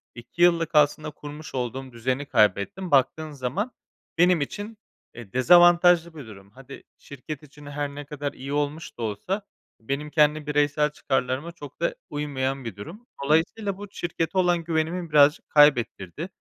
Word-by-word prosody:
2 120 +8 -8
yıllık 170 -2 +3
aslında 150 +1 +3
kurmuş 150 -1 -10
olduğum 130 +1 -4
düzeni 130 +4 -2
kaybettim. 115 - +1
Baktığın 150 +3 +2
zaman 145 - -3 0.5
benim 175 -1 +4
için, 205 +9 -5 0.4
eee, 115 -5 -11
dezavantajlı 175 +3 +5
bir 140 -7 -9
durum. 100 -2 -13
Hadi, 135 +1 -12
şirket 140 +2 -9
için 150 0 -15
her 145 0 -3
ne 145 0 -7
kadar 145 -1 -5
iyi 135 +2 -7
olmuş 145 +2 -3
da - - -8
olsa, 110 - -3 0.4
benim 140 +6 -4
kendi 150 -1 +2
bireysel 150 0 +1
çıkarlarıma 135 +2 -2
çok 145 -5 -12
da - - 0
uymayan 135 -3 -3
bir 115 - -6
durum. 175 - -10 0.2
Dolayısıyla 180 +7 +1
bu 205 0 -8
şirkete 170 -1 -3
olan 175 -2 +2
güvenimi 165 +1 -2
birazcık 150 0 +4
kaybettirdi. 140 - +3
Eee, 175 - -3
150 Hz, 155 wpm, -25 LUFS, 135-170 Hz, 0.5 s, dezavantajlı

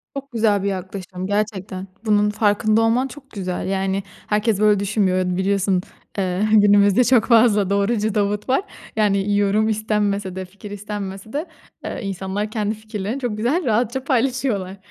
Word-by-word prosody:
Çok 275 0 -6
güzel 215 -4 +2
bir - - 0
yaklaşım 185 -1 -5
gerçekten. 200 -2 -2 0.2
Bunun 210 -1 +3
farkında 215 +1 +2
olman 235 +4 +2
çok 275 0 -13
güzel. 185 -4 -4
Yani 195 0 -1 0.2
herkes 210 0 +1
böyle 210 -1 +4
düşünmüyor. 185 -3 +1
Biliyorsun, 190 -1 +1 0.4
eee, 185 0 0
günümüzde 205 +1 +5
çok 245 -2 +4
fazla 220 -5 +4
doğrucu 205 +2 +1
Davut 205 +2 0
var. 265 - +3 0.3
Yani 205 -1 +2
yorum 205 +2 +2
istenmese 205 -3 -1
de, 190 0 -4
fikir 200 +2 -12
istenmese 205 0 -6
de, 300 +4 -2 0.4
eee, - - -4
insanlar 195 +2 -3
kendi 215 -1 -1
fikirlerini 215 +2 -5
çok 240 -5 -3
güzel 270 +11 0
rahatça 240 +2 0
paylaşıyorlar. 245 -7 0
205 Hz, 150 wpm, -21 LUFS, 195-220 Hz, 0.4 s, günümüzde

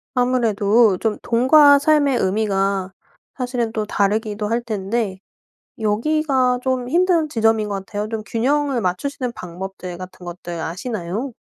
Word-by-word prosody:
아무래도 230 -4 +3
좀 220 -2 -1
돈과 285 +5 +6
삶의 285 -3 +3
의미가 195 -1 0 0.4
사실은 245 -3 -2
또 215 -1 -2
다르기도 210 +1 -1
할 230 +3 0
텐데 215 -2 -2 0.6
여기가 255 +3 +1
좀 255 -1 -1
힘든 340 -1 +2
지점인 225 -3 +1
것 200 - -2
같아요. 205 +1 -4
좀 220 -1 -3
균형을 270 +1 0
맞추시는 245 +7 -2
방법들 180 -1 -7
같은 185 0 -10
것들 175 -1 -6
아시나요? 195 +7 -4
225 Hz, 290 characters per minute, -20 LUFS, 195-255 Hz, 0.6 s, 돈과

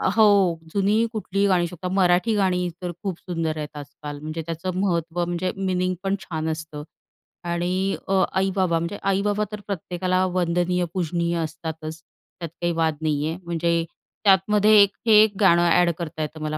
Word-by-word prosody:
हो, 200 -6 +5 0.2
जुनी 205 +3 +2
कुठलीही 200 -2 0
गाणी 185 -3 +3
होऊ - - -1
शकतात. 180 +1 -6
मराठी 185 +4 +3
गाणी 180 -3 +1
तर 180 -1 -3
खूप 190 -4 -3
सुंदर 165 -3 -3
आहेत 150 -1 -6
आजकाल, 145 0 -8
म्हणजे 155 +2 -5
त्याचं 170 +3 -4
महत्त्व, 175 -2 0
म्हणजे 175 +1 -2
मीनिंग 185 -1 -1
पण 195 0 +1
छान 160 -3 -4
असतं 155 -2 -5 0.6
आणि 180 +3 0
अ, 190 0 +3
आई-बाबा, 190 -2 +1
म्हणजे 170 +5 -4
आई-बाबा 200 +2 +1
तर 210 - -5
प्रत्येकाला 185 -1 -1
वंदनीय, 175 0 0
पूजनीय 170 -1 -1
असतातच, 160 0 -5 0.4
त्यात 170 -2 -5
काही 175 0 +1
वाद 160 -1 +1
नाहीये. 155 +1 -1
म्हणजे 170 0 0 0.4
त्यातमध्ये 205 +2 +4
एक 200 -1 +4 0.2
हे - - +5
एक 215 -1 +1
गाणं 170 -4 +5
अ‍ॅड 175 0 +4
करता 160 -2 -5
येतं 155 +1 -4
मला 155 0 -2
175 Hz, 165 wpm, -23 LUFS, 165-190 Hz, 0.6 s, हो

